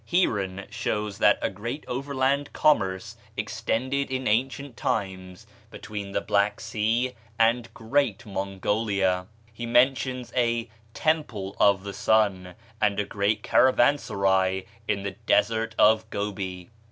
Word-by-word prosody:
Heeren 100 - 0
shows 105 -3 -3
that - - +5
a - - +2
great 115 +9 -6
overland 140 +2 -1
commerce 95 -11 +1 0.2
extended 135 +4 -1
in 130 0 -2
ancient 130 +4 0
times 95 -8 -3 0.2
between 100 -2 -7
the - - -1
Black 100 0 +1
Sea 115 +3 0 0.2
and 115 +1 +2
"Great 115 -1 0
Mongolia;" 95 -1 -1 0.3
he 120 +1 -6
mentions 125 +1 +2
a 120 -1 +1 0.3
"Temple 115 -12 -1
of 100 -2 +4
the 100 -1 -6
Sun," 95 -5 +1 0.3
and 105 -1 +2
a 105 - 0
great 105 +2 0
caravansary 100 -8 +3 0.2
in 100 - -1
the 100 - -2
desert 110 +4 +1
of 110 +1 +4
Gobi. 95 -3 -4
110 Hz, 120 wpm, -26 LUFS, 100-125 Hz, 0.3 s, that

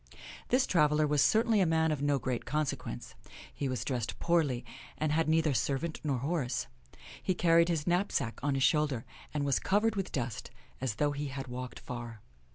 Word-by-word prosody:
This 255 +1 +4
traveler 150 -3 +3
was 145 -1 +2
certainly 220 +3 +4
a - - +4
man 160 0 +2
of 150 -2 -2
no 145 -1 +2
great 130 -2 -2
consequence. 150 - -3 0.4
He 140 - -2
was 125 -2 -3
dressed 120 -4 -2
poorly, 145 -8 +1 0.3
and 155 -1 0
had 160 +1 +2
neither 160 -2 +3
servant 140 +5 -1
nor 140 -4 0
horse. 135 -1 -1 0.6
He 185 - 0
carried 170 0 +4
his 160 -3 0
knapsack 175 - 0
on 140 0 0
his 135 - +1
shoulder, 135 -2 +2 0.3
and 145 -2 -1
was 140 -2 +2
covered 210 +3 +2
with 195 -2 -2
dust, 120 -6 -3 0.3
as 130 -5 -1
though 145 +5 +1
he 145 0 -3
had 135 -1 -5
walked 125 0 -6
far. 120 -2 -7
145 Hz, 180 wpm, -31 LUFS, 130-165 Hz, 0.6 s, This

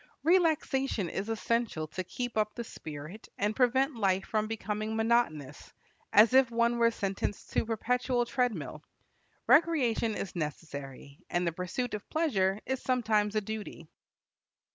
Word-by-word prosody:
Relaxation 295 - +2
is 195 +6 -4
essential 225 -6 -1
to 185 +4 -5
keep 245 +7 -5
up 215 -1 0
the 235 - -4
spirit 155 0 -9
and 210 +2 0
prevent 265 +2 +2
life 195 -3 +1
from 215 -1 -1
becoming 215 0 -3
monotonous, 220 - 0 0.4
as 220 +4 +6
if 260 -2 +6
one 235 0 +1
were 230 0 +5
sentenced 200 -2 -4
to - - +2
perpetual 245 +2 0
treadmill. 210 - -2 0.6
Recreation 250 -10 +3
is 190 - -5
necessary, 140 -3 -6
and 175 +1 0
the 170 - +1
pursuit 180 +9 -3
of 210 -1 -6
pleasure 205 - +1
is 265 0 -2
sometimes 220 -5 +1
a 215 - +2
duty. 210 -6 -7
220 Hz, 140 wpm, -30 LUFS, 185-245 Hz, 0.6 s, as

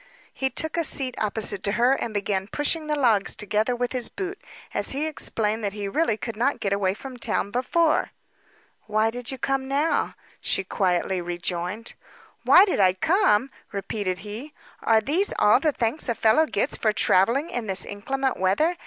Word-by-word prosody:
He 265 - -1
took 315 +4 -2
a 335 - +2
seat 265 -4 0
opposite 210 -2 -1
to 200 0 0
her, 245 +3 +3
and 235 - -2
began 200 -2 -2
pushing 305 +5 -1
the 300 - 0
logs 230 -8 +3
together 215 +4 0
with 245 0 -2
his 250 -3 -1
boot, 390 +1 -6 0.3
as - - 0
he 285 +3 -1
explained 220 -8 -2
that 200 -1 -2
he 205 -1 -4
really 225 0 0
could 230 0 -5
not 255 +6 0
get 200 -1 -1
away 195 -1 0
from 260 +2 -9
town 215 -3 -1
before. 305 +7 +1 0.8
"Why 215 +1 +1
did 245 +1 -6
you 265 - -3
come 270 +1 -1
now?" 285 +4 0 0.3
she 195 - 0
quietly 185 -1 0
rejoined. 175 +4 -4 0.5
"Why 370 - +7
did 375 - -1
I 185 -2 +5
come?" 270 - +2 0.2
repeated 200 -1 -3
he. 235 +9 -7 0.3
"Are 225 -1 +3
these 335 - +2
all 210 +4 +5
the 305 +2 +1
thanks 245 +2 -1
a 235 - +1
fellow 265 +10 +3
gets 205 - 0
for 215 - +2
travelling 235 - +2
in 240 -3 -3
this 190 -1 0
inclement 265 +6 -2
weather? 300 - +1
230 Hz, 180 wpm, -24 LUFS, 200-275 Hz, 0.8 s, Why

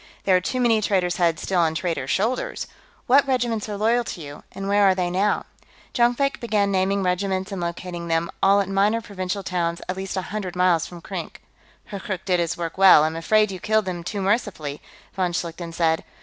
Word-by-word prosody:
"There 190 - +4
are 180 - +3
too 255 +7 -2
many 230 -3 +3
traitors' 185 -4 +1
heads 170 -3 +1
still 190 -2 0
on 160 -2 +2
traitors' 165 -6 -2
shoulders.... 255 - -1 0.4
What 275 +3 +5
regiments 240 -5 0
are 205 - -4
loyal 230 +3 +2
to - - -6
you, 145 -1 -9
and 195 +1 -6
where 205 +1 +3
are 190 -1 +5
they 180 -1 -1
now?" 200 +3 +1 0.5
Jonkvank 245 +4 +2
began 210 -4 +1
naming 195 +1 +1
regiments 190 +1 -1
and 195 -2 -4
locating 170 0 -5
them, 165 0 0
all 200 +1 +5
at 195 - -3
minor 200 +3 +2
provincial 200 -2 -4
towns 170 -2 -1
at 185 - -2
least 190 0 -5
a 190 - -1
hundred 190 -4 -4
miles 180 -3 +2
from 175 -1 -11
Krink. - - -7 0.5
"Hurkkurk 200 -2 -5
did 180 -2 +2
his 170 -1 -1
work 170 +1 -5
well; 190 -6 +8
I'm 160 +1 -1
afraid 210 +5 +2
you 185 - -6
killed 215 +1 +1
him 175 -2 -4
too 200 +2 -3
mercifully," 190 - -1 0.3
von 180 -2 -1
Schlichten 170 0 -4
said. 165 -1 +1
190 Hz, 205 wpm, -23 LUFS, 175-210 Hz, 0.5 s, well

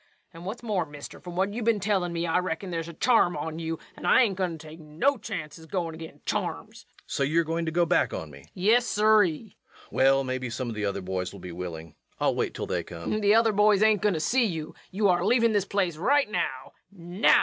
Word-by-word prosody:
And 165 +1 -11
what's 225 +5 -6
more, 205 -6 0
mister, 145 -1 -10
from 175 -1 -9
what 195 +2 0
you 240 - -4
been 225 -1 +2
tellin' 195 -3 0
me 170 0 -2
I 170 +2 +2
reckon 180 +1 -3
there's 165 -1 -3
a 170 - -8
charm 180 -3 +3
on 160 +2 -4
you, 165 0 -3 0.2
and - - -6
I - - +6
ain't 200 -5 0
goin' 180 -3 -2
to 160 0 -12
take 155 +2 -11
no 160 - 0
chances 160 - -7
goin' 170 -2 -2
agin 160 0 -10
charms. - - -4
REVENUE. - - -27
So - - -4
you're 155 +5 +3
going 165 +1 -2
to - - 0
go 175 +1 +2
back 175 +2 +2
on 80 -2 -6
me? 70 - -12
LUKE. 70 +3 -20
Yes, 225 +6 +3
siree. 210 -2 +4
REVENUE. 175 +7 -9 0.4
Well, 135 +1 +4
maybe 130 -1 -3
some 125 +1 -4
of 115 - -5
the 105 -1 -2
other 100 0 -2
boys 90 -1 -3
will 100 - -11
be 90 0 -8
willing. 85 -2 -7 0.3
I'll - - +2
wait - - -2
till - - -3
they 90 - -1
come. 85 0 -7
LUKE. 215 - 0
The 205 +1 +5
other 225 0 +4
boys 210 0 +4
ain't 215 -3 +4
goin' 205 -4 +2
to - - -1
see 245 +10 +2
you. 160 -6 -4 0.2
You're 190 -2 +2
a 175 - -1
leavin' 230 -2 +4
this 205 -2 +2
yer - - -28
place 185 -5 0
right 270 - +2
now 130 -10 -2 0.2
now! 180 +1 +3
170 Hz, 255 wpm, -27 LUFS, 150-205 Hz, 0.4 s, I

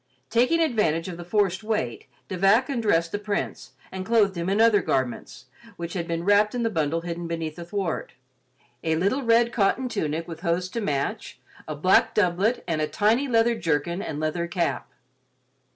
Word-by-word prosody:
Taking 250 +8 +3
advantage 210 - +1
of 175 - -7
the 175 - -7
forced 195 +1 0
wait, 175 - -2 0.2
De 185 - -4
Vac 200 +8 +3
undressed 205 -11 +1
the 205 - -2
Prince 210 -1 -4 0.2
and 190 0 -5
clothed 210 -2 +2
him 170 +1 -2
in 200 +2 +1
other 225 -3 +5
garments, 130 -1 -2 0.3
which 170 0 -5
had 170 -3 -3
been 170 -1 -2
wrapped 205 +3 +3
in 240 - -1
the 225 - 0
bundle 160 -2 0
hidden 170 0 -5
beneath 165 -2 -4
the 175 - -7
thwart; 185 -2 -3 0.7
a 160 -1 +1
little 200 - +1
red 235 -1 +3
cotton 235 +5 +1
tunic 165 -7 -2
with 165 -2 -7
hose 175 +2 -1
to 230 - -4
match, 140 -8 -3 0.3
a 155 - -4
black 185 +6 +3
doublet 200 +4 +1
and 160 -3 -1
a 155 - +1
tiny 225 - +2
leather 235 -1 +3
jerkin 170 -2 -1
and 150 -6 -5
leather 155 +2 -1
cap. 170 -7 -2
185 Hz, 185 wpm, -25 LUFS, 165-220 Hz, 0.7 s, other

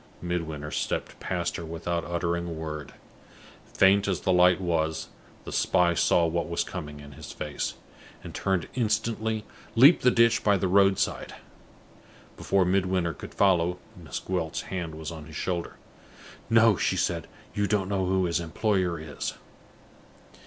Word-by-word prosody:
Midwinter 80 -4 -3
stepped - - -3
past 85 -2 -2
her 85 - -6
without 85 +1 -3
uttering 85 0 -2
a - - -5
word. 80 -2 -6 0.7
Faint 100 +1 +4
as 95 -3 -1
the 95 - +2
light 90 0 +5
was, 80 -3 -1 0.3
the - - -8
spy 85 -1 +3
saw 85 0 +3
what 85 +1 -1
was 85 - 0
coming 75 -5 -7
in 75 0 -11
his 65 - -10
face, 75 -1 -4 0.5
and, - - -8
turning 95 -4 -1
instantly, 110 -2 -1 0.3
leaped 135 +9 +7
the 125 - +5
ditch 115 -1 +3
by 100 -2 +4
the 95 - 0
road 95 +1 +4
side. - - -2 1.0
Before 95 -2 +1
Midwinter 90 -2 +1
could - - -10
follow, 90 -3 +3 0.2
Miss 80 -8 -7
Gwilt's 90 -3 -2
hand 85 -4 -5
was 80 +1 -6
on 80 -2 -8
his 80 - -11
shoulder. 85 +1 -3 0.7
"No," 115 -3 +5
she - - 0
said, - - -1 0.3
"you 105 0 0
don't 100 -3 +1
know 95 -2 0
who 95 0 +2
his 85 0 0
employer 90 0 0
is." 75 -3 -5
90 Hz, 155 wpm, -27 LUFS, 85-95 Hz, 1.0 s, leaped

